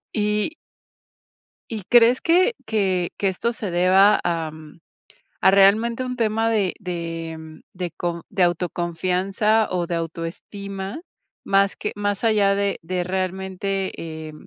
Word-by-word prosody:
Y 210 +6 0 1.2
¿Y 220 -3 -4
crees 240 +1 +6
que 370 +8 +3
que 190 -5 0
que 200 - 0
esto 190 +5 -1
se 215 -5 -5
deba 190 +4 +5
am, 160 -2 -4 0.6
a - - +6
realmente 215 +5 +4
un 250 0 -4
tema 225 -1 +1
de 205 -5 +1
de, 165 -3 -5
mm, 160 0 -12
de 180 -1 -4
con 170 0 -4
de 195 -2 0
autoconfianza 180 +5 +1
o 180 -2 -1
de 170 - -3
autoestima, 190 - -5 0.4
más 195 0 +2
que 210 - -3
más 205 0 -2
allá 205 -3 +3
de 200 -1 -1
de 180 +1 -2
realmente, 190 +1 -2
eh, 160 -1 -7
190 Hz, 135 wpm, -22 LUFS, 175-210 Hz, 1.2 s, crees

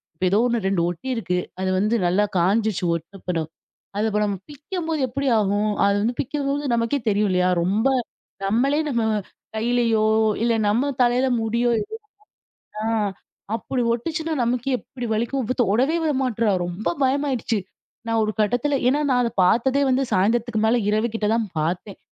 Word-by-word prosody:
இப்ப 180 - -2
ஏதோ 205 - +4
1 235 -2 0
2 195 -3 +1
ஒட்டி 175 +9 -7
இருக்கு. 180 -6 -1 0.2
அது 190 - 0
வந்து 215 +4 +1
நல்லா 190 +4 +2
காஞ்சுச்சு 205 +3 +1
ஒட்டனப்பறம். 170 -1 -4 0.5
அது 215 +2 +1
இப்ப 210 0 +1
நம்ம 200 -1 -2
பிக்கம்போது, 320 +2 -4
எப்பிடி 270 +2 -1
ஆகும்? 205 +1 +1 0.2
அது 200 - +2
வந்து 240 +3 0
பிக்கும்போது 280 -1 -2
நமக்கே 230 +4 0
தெரியும் 205 0 +2
இல்லயா! 180 0 +2
ரொம்ப 205 +8 +1 0.6
நம்மளே 255 +9 +2
நம்ம 235 -4 0 0.5
கையிலயோ, 230 -1 +2 0.4
இல்ல 235 0 +3 0.2
நம்ம 250 +7 +1
தலையில 245 +2 +2 0.2
முடியோ, 235 +2 +1
ஏதோ 440 +1 -8 0.9
ஆ - - -2 0.7
அப்புடி 245 +3 -2
ஒட்டுச்சுன்னா 320 +6 -3
நமக்கே 250 +3 0
எப்பிடி 245 -1 -7
வலிக்கும்! 235 +5 -1
இவ 250 - -1
தொடவே 250 - +2
விட 315 - +2
மாட்றா! 230 -4 +1
ரொம்ப 175 +5 -4 0.2
பயமாயிடுச்சு. 265 -4 0 0.5
நான் 225 0 +1
ஒரு 215 - 0
கட்டத்தில 245 +7 +1
ஏன்னா 275 +4 +3
நான் 250 -1 +3
அத 235 - +1
பாத்ததே 255 +9 +3
வந்து, 260 +1 +2
சாயந்தரத்துக்கு 225 +4 +1
மேல 230 +2 +3
இரவு 215 +2 +2
கிட்டதான் 225 0 0
பாத்தேன். 175 +6 -2
230 Hz, 155 wpm, -23 LUFS, 205-260 Hz, 0.9 s, ஏதோ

